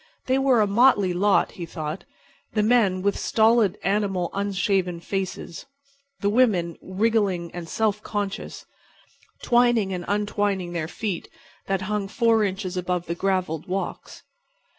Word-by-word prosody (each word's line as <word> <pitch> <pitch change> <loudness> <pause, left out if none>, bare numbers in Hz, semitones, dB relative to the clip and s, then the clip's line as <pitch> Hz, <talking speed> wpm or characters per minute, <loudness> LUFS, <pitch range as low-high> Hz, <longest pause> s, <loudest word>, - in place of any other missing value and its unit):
They 260 +1 +2
were 265 -4 +4
a - - +4
motley 205 -3 +4
lot, 195 +3 +2
he 175 - -7
thought; 155 +1 -5 0.5
the 215 - +2
men 210 -5 +3
with 200 0 +1
stolid, 220 -4 +3
animal, 195 -3 0
unshaven 195 -3 0
faces; 190 0 -5 0.5
the 200 - +2
women 200 -9 +2
wriggling 190 -3 0
and 170 -2 -7
self 210 -1 0
conscious, 205 -2 -4 0.8
twining 240 -5 +3
and 180 -1 -4
untwining 205 -3 -1
their 160 -2 -2
feet 195 0 -4 0.4
that 195 -1 -1
hung 210 0 -2
four 225 +1 +2
inches 190 -2 -3
above 180 -1 -2
the 170 - -2
gravelled 185 -3 -1
walks. 190 +2 -5
195 Hz, 135 wpm, -24 LUFS, 180-215 Hz, 0.8 s, were